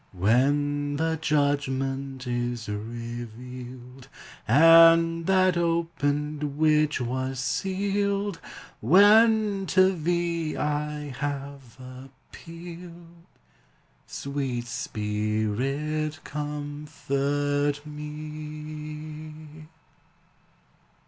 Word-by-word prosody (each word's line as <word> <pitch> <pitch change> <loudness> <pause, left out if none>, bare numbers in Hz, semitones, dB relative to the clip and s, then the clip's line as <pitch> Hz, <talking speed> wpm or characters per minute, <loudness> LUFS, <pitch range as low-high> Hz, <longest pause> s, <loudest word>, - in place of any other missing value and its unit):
When 145 +8 +1
the 160 +2 0
judgment 135 -3 -1
is 120 -1 -2
revealed, 120 +3 -7 0.4
And 165 +4 +6
that 185 -1 +4
opened 150 -4 -1
which 155 -1 +3
was 130 +2 -2
sealed, 200 +4 -1 0.4
When 205 - +5
to 185 +1 +4
thee 170 -1 -1
I 150 0 -2
have 140 -3 -5
appealed, 165 +6 -12 0.8
Sweet 135 -4 -3
Spirit, 120 +9 -2
comfort 145 -1 -2
me! 150 0 -8
150 Hz, 60 wpm, -26 LUFS, 130-165 Hz, 0.8 s, And